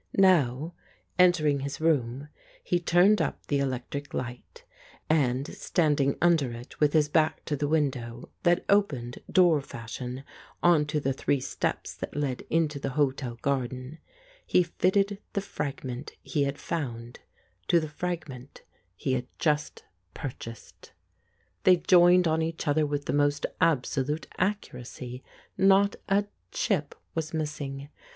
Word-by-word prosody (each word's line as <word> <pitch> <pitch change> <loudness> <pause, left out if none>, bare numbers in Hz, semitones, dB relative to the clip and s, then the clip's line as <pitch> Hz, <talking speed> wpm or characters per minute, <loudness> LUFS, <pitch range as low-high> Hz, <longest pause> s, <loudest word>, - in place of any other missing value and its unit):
Now, 165 -5 +3 0.5
entering 155 -6 +4
his 140 +1 -5
room, 140 -4 0 0.4
he 175 - +1
turned 180 +3 +4
up - - -3
the 140 - 0
electric 140 +1 -3
light, 125 - -6 0.5
and, 135 -4 +2
standing 145 -5 +1
under 165 -7 +3
it 120 +2 -10
with 150 -1 +3
his 155 -2 +4
back 155 +1 +1
to 150 - -1
the 145 +1 -1
window, 130 -6 -1
that 175 +1 +2
opened, 140 -13 +1
door 175 -5 +5
fashion, 125 +1 -7 0.4
on 165 -4 +5
to 150 0 0
the 135 -2 0
three 140 +1 0
steps 130 - -3
that - - -7
led 140 -4 -1
into 155 -3 +1
the 135 - -2
hotel 130 -4 0
garden, 130 +2 -2 0.4
he 180 - +3
fitted 195 +3 +1
the - - +1
fragment 135 -6 -5
he 145 -2 0
had 140 +1 -3
found 120 -7 -5 0.5
to 170 - +5
the 155 - -3
fragment 150 -5 -6 0.3
he 130 +7 -1
had 125 -1 -2
just 150 -1 0 0.3
purchased. 115 -4 -8 0.7
They 185 - +6
joined 175 0 +5
on 160 0 +2
to 160 - +1
each 165 0 -6
other 150 +1 +2
with 145 0 -2
the - - -1
most 145 0 +2 0.2
absolute 150 -1 +1
accuracy, 125 -9 -3 0.4
not 195 +1 +5
a 200 +1 +3 0.3
chip 155 -9 -1 0.2
was 160 0 -3
missing. 145 -3 -4
145 Hz, 140 wpm, -28 LUFS, 130-170 Hz, 0.7 s, They